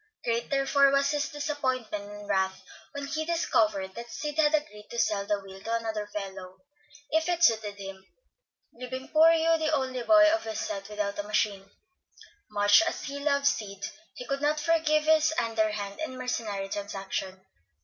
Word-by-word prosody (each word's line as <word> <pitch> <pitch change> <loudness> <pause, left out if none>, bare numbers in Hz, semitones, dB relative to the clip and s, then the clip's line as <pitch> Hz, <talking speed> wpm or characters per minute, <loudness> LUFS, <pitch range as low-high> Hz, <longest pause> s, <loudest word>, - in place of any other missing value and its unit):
Great, 235 0 -1
therefore, 275 0 +4
was 275 0 +2
his 295 0 -1
disappointment 260 -9 -3
and 205 0 -10
wrath 190 -1 0 0.3
when 285 0 -5
he 310 +3 -2
discovered 215 - +1
that 235 +2 -8
Sid 295 +3 -4
had 310 0 +4
agreed 210 -9 -5
to 235 - -7
sell 200 -3 +1
the 205 -1 +1
wheel 195 -1 -12
to 230 +3 -2
another 220 -2 -3
fellow, 190 -3 -7 0.5
if 320 +2 +1
it 345 -1 0
suited 220 -7 +3
him, 195 -1 -9 0.7
leaving 255 +2 -7
poor 320 +1 +6
Hugh 330 0 +3
the 315 -1 0
only 260 -4 -1
boy 315 +6 +6
of 330 - 0
his 220 -1 -4
set 200 -1 -4
without 210 -1 -3
a - - -1
machine. 205 -2 0 0.8
Much 205 +6 +5
as 335 - -2
he 285 0 -5
loved 280 -1 +1
Sid, 200 -6 -1 0.3
he 250 - -7
could 275 +1 -2
not 300 +1 +1
forgive 310 -1 +2
this 315 0 +4
underhand 215 -3 -1
and 310 -5 -4
mercenary 220 -6 -3
transaction. 195 -1 -4
235 Hz, 170 wpm, -28 LUFS, 205-295 Hz, 0.8 s, poor